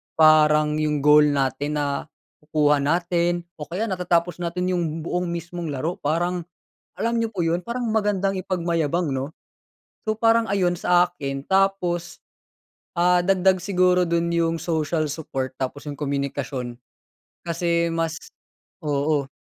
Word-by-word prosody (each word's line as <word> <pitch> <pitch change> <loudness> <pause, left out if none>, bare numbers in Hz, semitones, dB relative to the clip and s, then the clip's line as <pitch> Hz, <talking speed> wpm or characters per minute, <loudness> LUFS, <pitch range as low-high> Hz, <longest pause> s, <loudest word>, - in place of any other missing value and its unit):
parang 155 -1 +5
'yong 150 -2 0
goal 150 0 +7
natin 140 +1 -1
nakukuha 150 +1 -1
natin, 175 +2 +1 0.2
o 150 - -6
kaya 180 +6 -3
natatapos 175 -2 0
natin 180 +1 -2
'yong 175 -1 0 0.2
buong 180 +2 -2
mismong 170 0 -5
laro, 155 +6 -2
parang, 175 +3 -1 0.6
alam 230 +1 0
niyo - - +1
po 180 - -1
'yon, 165 +1 +1
parang 240 +1 -3
magandang 205 -3 +1
ipagmayabang, 170 -3 0
'no? 135 +3 -3 0.7
So, 215 0 -1
parang 225 -1 +3
ayun 180 -3 +2
sa 175 0 +4
akin, 135 -5 -5
tapos, 190 -3 0 0.8
ah, 180 +1 +4
dagdag 190 0 +3
siguro 180 -1 +3
do'n 170 0 +1
'yong 165 -1 +1
social 160 -1 0
support, 135 -4 -4
tapos 135 +2 -4
'yong 145 -1 -6
komunikasyon. 140 -3 -3 0.7
Kasi 170 0 +1
mas 165 -1 -1 0.7
oo. 145 -1 0
170 Hz, 130 wpm, -23 LUFS, 150-180 Hz, 0.8 s, goal